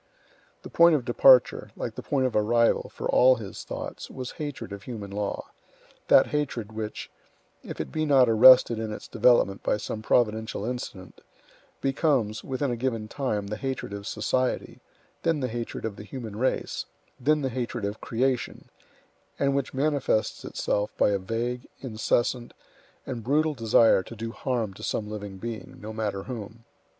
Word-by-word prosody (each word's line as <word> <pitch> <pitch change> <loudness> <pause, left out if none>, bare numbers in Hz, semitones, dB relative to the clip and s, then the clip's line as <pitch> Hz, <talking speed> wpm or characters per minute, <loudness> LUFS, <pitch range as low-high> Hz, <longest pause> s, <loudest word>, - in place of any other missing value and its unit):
The - - -8
point 170 -1 +6
of 130 -5 -1
departure, 125 0 +5
like - - -4
the - - -7
point 135 -3 0
of 130 - -1
arrival, 115 +2 +2
for - - -5
all 130 +1 +6
his 105 -5 -8
thoughts, - - -6
was 130 -1 -6
hatred 145 -9 -6
of 100 - -7
human 105 -4 -7
law; 100 0 -3 0.6
that - - +7
hatred 130 -7 -2
which, 110 -1 -6 0.5
if - - -8
it - - -4
be 155 - -1
not 135 -3 +6
arrested 115 0 +7
in 110 -1 -3
its 105 - -7
development 110 -4 +3
by - - +1
some 110 +1 -5
providential 110 -2 +1
incident, 110 -7 -6 0.6
becomes, 135 -6 +1
within 135 0 -2
a - - -1
given 115 -3 -2
time, 110 -7 -2
the 105 +2 -4
hatred 130 -6 -4
of 100 0 -6
society, 130 +4 -1 0.4
then 165 -2 +1
the 130 - -1
hatred 120 -1 -5
of 110 -3 -4
the - - -8
human 110 0 -7
race, 130 +4 -1 0.3
then 150 +4 +2
the 135 - 0
hatred 120 -3 -3
of 100 +2 -4
creation, 125 +2 -1 0.7
and 140 0 +1
which 140 -2 -1
manifests 140 -5 0
itself 105 0 -1
by - - +3
a 100 - +1
vague, 120 +5 -3
incessant, 120 0 -1 0.5
and 120 -3 -5
brutal 150 +5 +2
desire 115 -4 +4
to 115 - -10
do 115 +1 -5
harm 115 -5 -2
to - - -13
some 105 - -2
living 105 -2 -7
being, 115 +2 -7
no 110 +1 -7
matter 105 -3 -3
whom. 115 -1 -8
115 Hz, 165 wpm, -26 LUFS, 105-130 Hz, 0.7 s, that